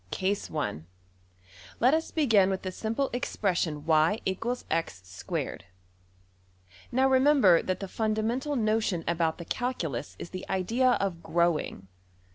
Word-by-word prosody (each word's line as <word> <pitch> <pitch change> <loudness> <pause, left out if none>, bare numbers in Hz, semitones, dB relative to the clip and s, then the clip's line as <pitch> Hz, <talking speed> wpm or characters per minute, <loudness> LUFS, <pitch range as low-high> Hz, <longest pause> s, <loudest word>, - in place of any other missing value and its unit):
\Case 195 - -1
Let 90 - -4
us 320 +1 0
begin 225 - +3
with 190 -1 -2
the 185 - -3
simple 230 +8 -2
expression 175 -10 -1
$y=x^2$. 165 - -1 1.3
Now 260 +2 +3
remember 260 - +5
that 185 - -2
the 195 - -5
fundamental 225 +8 -1
notion 215 -6 0
about 165 -1 0
the 170 - -8
calculus 165 - -3
is - - -8
the 185 0 -7
idea 230 +7 +2
of 190 -7 -2
\emph{growing}. 170 - 0
190 Hz, 110 wpm, -28 LUFS, 160-235 Hz, 1.3 s, remember